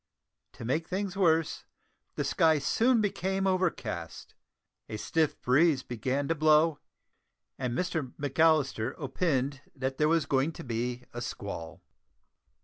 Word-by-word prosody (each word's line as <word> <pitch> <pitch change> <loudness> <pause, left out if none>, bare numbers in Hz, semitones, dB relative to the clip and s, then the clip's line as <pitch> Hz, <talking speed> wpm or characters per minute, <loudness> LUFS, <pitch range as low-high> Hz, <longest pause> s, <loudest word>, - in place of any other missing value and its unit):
To - - -9
make 155 +7 -1
things 190 0 -3
worse, 165 -4 +2 0.5
the - - -1
sky 160 -2 +3
soon 230 - +2
became 195 -1 -1
overcast, 170 - -2 0.6
a 110 - -4
stiff 160 +7 0
breeze 140 +2 +3
began 130 +4 -2
to 165 - +2
blow, 155 0 +4 0.8
and 125 -2 -2
Mr 160 -8 -2
McAllister 145 -4 +2
"opined" 140 -2 -1
that 135 -1 -3
there 150 0 +4
was 165 -1 +2
going 140 +4 +1
to - - -9
be 120 +1 -3
a 120 - -5
squall. 100 -8 -6
150 Hz, 130 wpm, -29 LUFS, 125-165 Hz, 0.8 s, blow